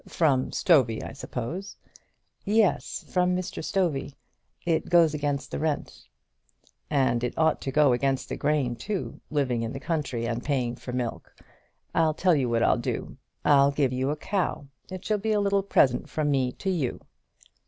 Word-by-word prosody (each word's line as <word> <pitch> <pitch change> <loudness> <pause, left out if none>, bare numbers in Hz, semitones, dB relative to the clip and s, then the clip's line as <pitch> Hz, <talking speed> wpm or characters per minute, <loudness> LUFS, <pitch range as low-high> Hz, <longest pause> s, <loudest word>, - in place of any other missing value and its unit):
"From 140 -6 +2
Stovey, 130 - +3
I - - -7
suppose." 155 - -5 0.7
"Yes; 210 -2 +1
from 180 0 +1
Mr. 185 -2 -4
Stovey. 155 -7 -1 0.5
It 165 -2 0
goes 170 -3 +5
against 145 -2 -2
the - - -3
rent." 155 -1 -3 0.8
"And 130 -5 +2
it 125 - -3
ought 160 -1 +2
to 135 - -3
go 145 -2 +4
against 135 +1 0
the - - -4
grain 140 -5 0
too, 195 - -4
living 135 -6 0
in 115 +1 -3
the 135 - -5
country 140 -7 -2
and 120 +1 -2
paying 125 -5 -1
for 125 - -8
milk! 125 -2 -4 0.6
I'll 160 -2 +2
tell 180 +1 +3
you 135 -5 +1
what 115 -1 +2
I'll - - +3
do. - - -4 0.3
I'll 140 -1 +6
give 140 -2 +1
you 130 +2 0
a 150 - 0
cow. 185 -3 -2 0.2
It 185 -1 -7
shall 215 -1 +1
be 220 +2 0
a 210 - +2
little 200 -1 +2
present 135 -10 +2
from 150 -2 0
me 130 -3 +1
to 195 - -2
you." 150 -9 -2
145 Hz, 175 wpm, -27 LUFS, 130-175 Hz, 0.8 s, I'll